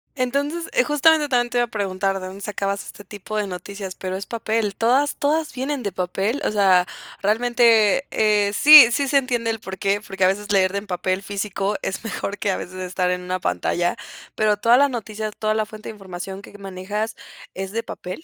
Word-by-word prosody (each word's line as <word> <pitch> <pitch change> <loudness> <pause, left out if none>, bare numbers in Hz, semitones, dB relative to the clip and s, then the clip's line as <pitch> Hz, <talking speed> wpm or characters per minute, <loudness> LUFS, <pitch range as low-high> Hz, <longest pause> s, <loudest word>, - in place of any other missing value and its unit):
Entonces, 285 +6 -1
eh, - - +4
justamente 295 +1 +3
también 245 -2 +1
te 245 - -1
iba 240 - +3
a - - -18
preguntar 195 -3 -2
de 185 - -7
dónde 190 +2 -10
sacabas 200 -1 -3
este 205 - -11
tipo 210 +1 -7
de 210 - 0
noticias, 190 +1 -7
pero 185 0 -5
es 195 - -6
papel, 220 -3 -2
¿todas, 260 +5 +2
todas 310 +1 0
vienen 265 +1 -3
de 200 - -2
papel? 195 +8 -2
O - - 0
sea, 190 -3 +4 0.3
realmente, 230 +2 +3
eh, 210 -2 +2
sí, 285 0 +9
sí 280 +3 0
se 280 - +3
entiende 240 -4 0
el 225 - -4
porqué, 195 0 -2
porque 195 -1 -3
a - - +6
veces 205 +2 -2
leer 190 -2 +3
de 200 - -2
en 205 - -13
papel 185 +1 -1
físico 200 0 -3
es 190 - -3
mejor 205 -2 -4
que 205 - -1
a 190 - 0
veces 185 - -8
estar 185 0 -1
en 180 0 -2
una 180 +1 -3
pantalla, 175 -1 -1 0.4
¿pero 215 -1 +1
todas 235 +4 +4
las 285 0 +4
noticias, 215 -3 -5
toda 215 0 0
la 215 0 -1
fuente 215 0 -10
de - - -6
información 190 -1 -8
que 205 - -13
manejas 200 +3 -4 0.4
es 190 0 -5
de 230 +2 -2
papel? 185 - -8
210 Hz, 210 wpm, -22 LUFS, 195-240 Hz, 0.4 s, sí